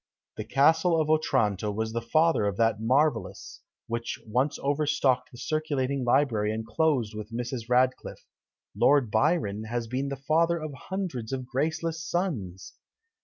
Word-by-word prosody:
The 110 - -4
Castle 160 +7 +3
of 155 0 +1
Otranto 110 -10 +1
was 110 +2 -3
the 115 - -1
father 155 0 +2
of 100 -1 -2
that 115 -2 +2
marvellous, 140 +7 0 0.2
which 115 -1 -4
once 125 +6 0
over 145 +2 0
stocked 130 -4 +1
the 120 - -13
circulating 140 -2 -1
library 120 -4 +2
and 110 +1 -4
closed 130 -4 0
with 105 0 -7
Mrs. 120 0 -5
Radcliffe. 125 +1 0 0.5
Lord 135 -6 +3
Byron 110 - +1
has 120 +1 -3
been 130 +4 -3
the 140 - -3
father 160 +5 +1
of 155 -2 -6
hundreds 140 - -5
of 130 -1 -3
graceless 160 +5 -2
sons! 130 - -3
130 Hz, 150 wpm, -27 LUFS, 115-155 Hz, 0.5 s, Castle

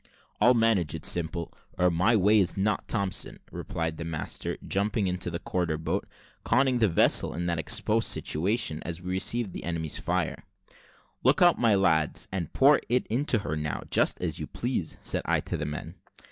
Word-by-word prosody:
"I'll 125 +1 +5
manage 110 -8 +2
it, - - -5
Simple, 85 0 -1 0.2
or 90 0 +3
my 90 +8 +3
name 100 -2 +2
is 100 -5 +3
not 105 +2 0
Thompson," 100 -5 -1
replied 80 -1 -4
the - - -5
master, 80 -2 -4
jumping 100 +1 0
into 90 -1 -2
the 85 - -3
quarter 85 -3 -2
boat, 80 +1 -3 0.4
conning 130 -2 +2
the 110 - +4
vessel 85 -3 +3
in 85 +1 -3
that 85 -1 -1
exposed 110 +7 +1
situation, 90 -1 0
as 85 0 -5
we 90 0 -6
received 100 +2 -1
the - - -6
enemy's 80 -3 -3
fire. - - -2 0.8
"Look 140 +9 +4
out, 175 -1 +5
my 115 -4 +4
lads, 80 -5 +2
and 90 -5 -3
pour 140 +2 +5
it 125 +1 +1
into 125 +1 +2
her 80 - -2
now, 75 -1 -3
just - - +2
as - - -2
you - - -5
please," - - -3
said - - +1
I - - +2
to - - -4
the - - -3
men. 80 +3 -6
90 Hz, 185 wpm, -27 LUFS, 80-110 Hz, 0.8 s, I'll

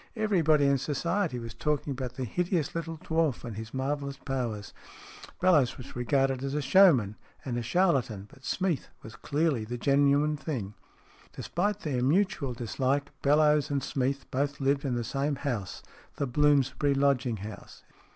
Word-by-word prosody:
Everybody 170 -10 +3
in 140 -1 +3
Society 170 +2 -1
was 115 -1 -7
talk 150 +2 -1
ing 145 - -3
about 130 -2 -5
the 130 - -3
hideous 175 - -1
little 165 -1 -4
dwarf 160 -4 0
and 115 -3 -6
his 110 +1 -7
marvellous 140 +1 -3
powers. 120 -8 -4 0.7
Bellowes 155 -9 +3
was 125 - -10
regarded 135 +1 +1
as 135 +1 -2
a - - +1
showman 135 - +5 0.3
and 125 -3 -2
a 120 - -1
charlatan, 120 - +1
but 135 0 -19
Smeath 180 -2 -1 0.2
was 110 - -10
clearly 150 -5 0
the 120 +3 -5
genuine 145 +3 +3
thing. 125 -10 -4 0.6
Despite 205 +3 -2
their 135 -5 -1
mutual 150 -1 +1
dislike, 135 +4 -1
Bellowes 150 +1 +3
and 140 -2 -1
Smeath 135 0 -1
both 140 +2 -1
lived 140 +1 +1
in 130 -3 0
the 120 - -1
same 140 +4 -1
house 120 -9 -4 0.3
the 140 - -1
Bloomsbury 145 +1 +2
lodging 135 -4 +1
house. 105 +1 -10
140 Hz, 160 wpm, -29 LUFS, 125-150 Hz, 0.7 s, showman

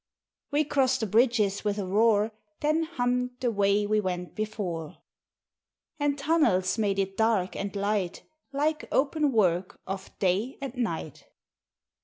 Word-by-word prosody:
We 295 +1 +2
crossed 265 -3 +1
the - - +1
bridges 215 -2 +2
with 205 -1 0
a 200 - -2
roar, 210 +2 +3 0.3
Then 310 +2 +2
hummed, 250 -5 -1
the 250 -2 0
way 200 0 +2
we 215 +1 +2
went 180 -2 -3
before. 200 -8 -4 1.0
And 290 -1 +1
tunnels 275 - +2
made 200 -2 +1
it 195 0 -1
dark 220 -4 +1
and 200 0 -4
light 200 -3 -1 0.3
Like 300 +2 0
open 295 +1 +2
work 185 -5 +1
of 195 0 -6
day 200 +7 0
and 275 -2 -5
night. 170 - -4
215 Hz, 140 wpm, -28 LUFS, 195-260 Hz, 1.0 s, roar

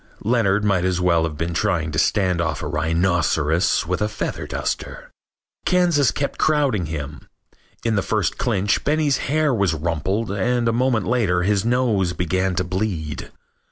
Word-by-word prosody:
Leonard 105 -3 +2
might 95 -4 +2
as 90 -1 0
well 85 -2 +3
have 80 -2 -5
been 85 +2 -2
trying 80 0 0
to 75 - -1
stand 90 -4 +1
off 80 -3 -2
a - - -3
rhinoceros 80 +2 +1
with 90 +3 -2
a 105 - +1
feather 110 - -4
duster. - - -4 0.5
Kansas 175 -6 +3
kept 140 - -3
crowding 140 - +1
him. 75 -1 -7 0.6
In 115 -1 +1
the 100 - +2
first 105 -5 -1
clinch 105 -4 0
Benny's 150 -2 +1
hair 155 -1 +2
was 100 -8 +1
rumpled 85 +7 -2
and 115 +4 0
a 115 - +2
moment 120 -4 +1
later 100 -7 +1
his 100 +1 +1
nose 115 -7 +1
began 95 +2 -1
to 90 - 0
bleed. 90 -5 -3
95 Hz, 160 wpm, -21 LUFS, 85-115 Hz, 0.6 s, well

